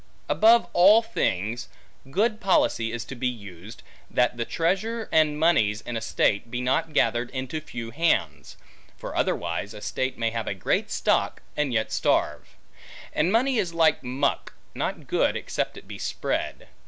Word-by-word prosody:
Above 230 +2 +5
all 205 +6 +7
things, 120 - -2 0.4
good 215 - +1
policy 115 - +2
is 120 0 -4
to 135 - -8
be 125 0 -2
used, 100 -3 -8 0.3
that 125 0 +2
the 120 -1 -2
treasure 205 - -1
and 155 -2 +3
moneys, 145 -11 +3
in 120 - -6
a 115 - -2
state, 110 0 0
be 120 +1 -3
not 135 +6 0
gathered 120 -4 +1
into 135 +4 -4
few 115 -6 -7
hands. 165 +7 0 0.4
For - - -7
otherwise 85 +5 -1
a - - -8
state 130 +4 -2
may 115 -1 0
have 115 -2 -4
a - - -2
great 95 - 0
stock, - - 0
and 150 -3 0
yet 110 -2 0
starve. - - 0 0.6
And 160 +5 +1
money 250 +2 +2
is 175 -5 -2
like 160 -4 +3
muck, 135 +3 -1 0.2
not - - -3
good - - +1
except - - -3
it - - -13
be - - -8
spread. - - -3
130 Hz, 165 wpm, -25 LUFS, 115-170 Hz, 0.6 s, all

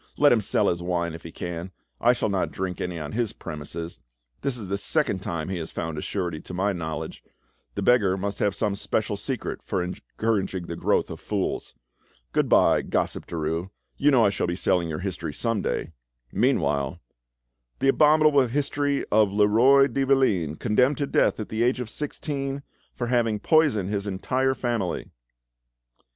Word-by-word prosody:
Let 145 0 +6
him 115 - +4
sell - - +2
his 85 0 0
wine 85 -1 -1
if 80 - -8
he 85 - -9
can; 85 +2 -5 0.3
I 120 +1 +5
shall 120 - -1
not 95 -2 0
drink 95 -1 -4
any 90 -1 -3
on 75 -2 -5
his 115 -2 -1
premises. 80 +1 -7 0.4
This 135 -3 -1
is 105 -5 -6
the 100 - -1
second 145 -3 +1
time 85 -3 -4
he 95 -2 -2
has 80 - -6
found 80 -1 -4
a 75 - -4
surety 85 -6 -3
to 90 - -8
my 100 +2 +1
knowledge; 80 -4 -5 0.5
the - - -2
beggar 105 -6 +4
must 100 +1 -3
have 100 -2 +1
some 105 -3 0
special 105 +1 -1
secret 125 +4 -4
for 95 -4 -2
encouraging 95 0 -2
the 85 - -5
growth - - +1
of - - -7
fools. 100 -3 -3 0.6
Good - - +1
bye, - - +5
gossip - - -2
Derues; 80 +2 -2 0.3
you 145 - +3
know 125 -6 +5
I 100 - +4
shall 100 - -1
be 85 - -1
selling 90 -2 +1
your 75 - -3
history 90 -6 -4
some 115 -4 0
day. 80 - -2 0.4
Meanwhile—— 70 -1 +1 0.8
"The 135 - +2
abominable 150 -2 +5
history 145 +2 0
of 105 -2 +4
Leroi 115 +7 +5
de 135 +1 -1
Valine, 110 - +2
condemned 125 - +2
to 145 - 0
death - - +2
at 110 - -5
the 110 +1 -2
age 125 +2 +2
of 125 -3 -5
sixteen 140 -2 -3 0.3
for 120 - -2
having 120 -3 +1
poisoned 120 - +3
his 100 -1 -2
entire 130 +7 0
family!" 115 -9 -2
100 Hz, 180 wpm, -25 LUFS, 90-125 Hz, 0.8 s, Let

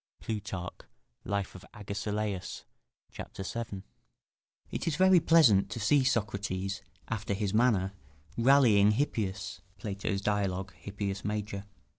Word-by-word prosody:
[Plutarch, 100 -5 -5 0.4
Life 100 -1 -2
of 95 - -11
Agesilaus, 105 -1 -3 0.5
c. - - -5 0.2
7.] 100 -2 -5 0.9
It - - -3
is 160 - +1
very 190 -1 +6
pleasant 150 -13 +5
to 115 - -5
see 130 +6 +4
Socrates, 100 -5 -1 0.3
after 105 -2 -2
his 100 -1 -1
manner, 105 -5 +3 0.4
rallying 115 -5 +5
Hippias, 100 -7 -2 0.2
[Plato's 100 0 -3
Dialogues: 95 -2 -1
Hippias 100 -1 -4
Major. 105 -1 -3
105 Hz, 110 wpm, -30 LUFS, 100-115 Hz, 0.9 s, very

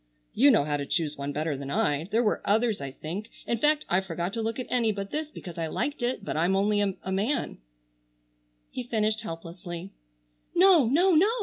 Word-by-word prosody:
You 275 +6 +6
know 230 - +5
how 145 0 -1
to 140 -1 -4
choose 155 -4 0
one 140 0 -4
better 150 +1 -1
than 135 0 -6
I. 145 +2 +1
There 225 +5 +1
were 210 - +1
others 220 -1 +1
I 140 - -4
think. 175 +11 -6 0.2
In 235 - -1
fact, 300 +3 +2
I 185 +2 +2
forgot 175 0 -4
to 230 - -2
look 225 +1 -2
at 255 - -3
any 235 -3 +2
but 200 -1 -5
this 305 0 -3
because 175 - -9
I 165 - -1
liked 285 - -2
it, 240 -4 -1
but - - -3
I'm 175 +5 +2
only 205 +1 +2
a 190 -2 -2
man——" 225 +8 -1 1.1
he - - -4
finished 220 -2 0
helplessly. 175 0 -7 0.6
"No! 355 -7 +6
No! 345 +10 +4
No!" 350 +7 +5
205 Hz, 205 wpm, -27 LUFS, 165-240 Hz, 1.1 s, You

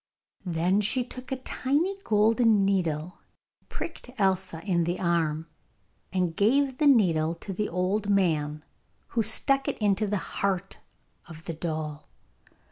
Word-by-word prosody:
Then 180 +4 +1
she 240 +5 +1
took 255 +1 -9
a 265 - -1
tiny 290 +8 -1
golden 220 - +3
needle, 175 -4 -1 0.5
pricked 330 -6 -7
Elsa 190 -4 0
in 180 -4 +1
the 175 +2 -2
arm, 165 -3 0 0.7
and 180 -3 0
gave 260 +6 +2
the 300 - +4
needle 170 - +3
to 195 +4 -7
the 210 +3 -2
old 190 +4 -1
man, 155 -6 +1 0.4
who 235 - 0
stuck 270 +5 +3
it - - -1
into 210 0 +1
the 205 +1 0 0.2
heart 195 -1 -1 0.5
of 160 -1 -11
the 165 - -4
doll. 155 -2 -5
195 Hz, 135 wpm, -27 LUFS, 165-220 Hz, 0.7 s, the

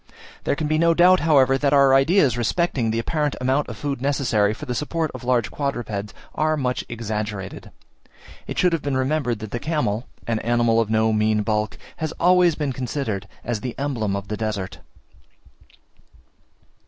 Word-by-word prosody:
There - - +1
can 155 - -3
be 155 +1 +1
no 170 0 +4
doubt, 180 +2 +6
however, 135 -4 +4
that 145 0 +2
our 140 -1 +6
ideas 135 - +4
respecting 120 0 0
the 110 - -1
apparent 150 +5 -1
amount 130 +3 0
of - - -7
food 140 -3 -3
necessary 125 -7 +1
for 130 +8 -7
the 125 - -3
support 155 +4 -2
of - - -8
large 120 -2 +1
quadrupeds 115 -8 -3 0.2
are 155 0 +1
much 125 -3 -1
exaggerated: 105 -4 -5 0.8
it - - -5
should 180 -1 +3
have 165 - 0
been 140 -2 -1
remembered 130 -3 0
that 110 -2 -7
the 120 - -3
camel, 135 -7 -1 0.2
an 115 -2 -1
animal 120 -1 +2
of 110 - -2
no 110 0 +2
mean 110 0 +2
bulk, 105 0 -1 0.2
has 160 0 -3
always 180 -1 +4
been 145 -3 -2
considered 120 -6 -3 0.2
as 115 -3 -3
the 125 -2 -5
emblem 120 -8 -1
of 100 0 -5
the 105 - -4
desert. 105 -4 -4
125 Hz, 175 wpm, -23 LUFS, 110-150 Hz, 0.8 s, doubt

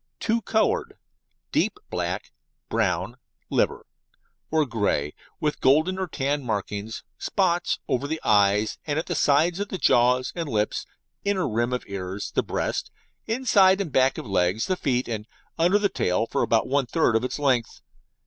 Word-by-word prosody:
Two 230 +1 0
Coloured: 225 - 0 0.5
Deep - - +1
black, - - -3 0.4
brown - - 0 0.3
(liver) - - +1 0.6
or 155 -1 +2
grey, 105 - -1 0.3
with 150 -1 -1
golden 155 +8 +3
or 190 - -1
tan 145 -2 -1
markings 105 -1 -4 0.2
(spots) 175 -3 +1
over 130 +3 0
the 160 +2 -3
eyes 105 0 +3
at 155 +2 -1
the 175 - -2
side 160 +4 +3
of 205 0 -3
the 190 - -3
jaw 125 -5 +4
and 165 -4 -4
lips, 105 -3 -1 0.4
inner 195 -5 0
rim 120 +1 0
of 125 - -2
ears, 95 0 -5
the - - +1
breast, - - -2 0.4
inside 205 -5 +4
and 185 -6 -3
back 130 0 +3
of - - -5
legs, 95 +1 +1
the 185 - 0
feet, 130 -7 0
and 110 -2 -4 0.3
under 175 +5 +4
the 205 -1 +2
tail 110 - 0
for - - -1
about 115 - +2
one 140 -1 +1
third 155 -5 +2
of 115 - +2
its 125 - -2
length. 130 -5 0
135 Hz, 160 wpm, -25 LUFS, 110-175 Hz, 0.6 s, jaw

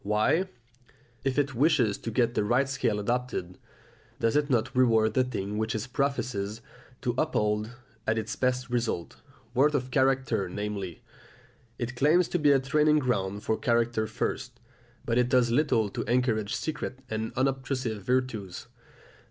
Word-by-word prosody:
Why, 105 - +2 0.8
if 135 0 -1
it 140 -1 +1
wishes 130 -5 +2
to - - -5
get 120 +1 +1
the 105 - +1
right 120 +6 +2
scale 115 -6 0
adopted, 120 -5 -2 0.6
does 115 +2 +1
it 150 0 +2
not 125 +1 +1
reward 115 -3 +4
the 130 - +3
thing 105 -4 -3
which 110 +2 -1
it 110 +3 -3
professes 125 -7 -1 0.4
to 120 -2 0
uphold 105 -6 0 0.3
as 110 +1 +2
its 110 0 -3
best 125 -1 -1
result, 115 -8 -2 0.4
worth 145 +4 +3
of 130 -1 -2
character 130 -7 +1
namely? 100 -2 -5 0.7
It 120 +1 -4
claims 155 +7 +4
to 175 - 0
be 150 -1 +5
a 140 - +5
training 150 +3 +3
ground 105 -7 -1
for 110 - 0
character 115 -2 +1
first, 120 +2 -3 0.5
but 115 +1 +1
it 125 0 +2
does 125 -2 +3
little 120 -5 +2
to - - -4
encourage 115 -4 +1
secret 150 -5 -4
and 110 0 -3
unobtrusive 130 -4 -1
virtues. 115 -5 -2
120 Hz, 150 wpm, -28 LUFS, 110-135 Hz, 0.8 s, be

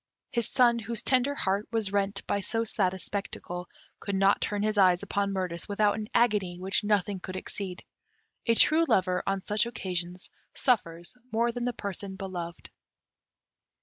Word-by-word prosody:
His 235 -3 0
son, 240 -2 +4
whose 230 0 -4
tender 260 +2 +3
heart 200 -3 0
was 225 -4 0
rent 200 0 0
by 200 - 0
so 225 +3 -1
sad 190 -4 0
a - - -5
spectacle, 180 -2 -5 0.3
could 200 - -3
not 195 +1 +3
turn 205 0 -1
his 215 0 +1
eyes 185 -3 +4
upon 200 0 -1
Mirtis 185 -2 -2
without 205 0 +3
an 215 -1 -4
agony 205 -7 +2
which 190 +3 0
nothing 205 -2 +1
could 185 +1 -6
exceed. 185 -1 -5 0.6
A 230 - +4
true 315 +7 +5
lover, 185 -5 +2
on 195 0 0
such 210 +4 +1
occasions, 180 -5 -4 0.2
suffers 175 - 0 0.2
more 235 +2 +2
than 240 0 -3
the 245 - 0
person 200 -2 -5
beloved. 175 -3 -6
200 Hz, 165 wpm, -28 LUFS, 185-225 Hz, 0.6 s, true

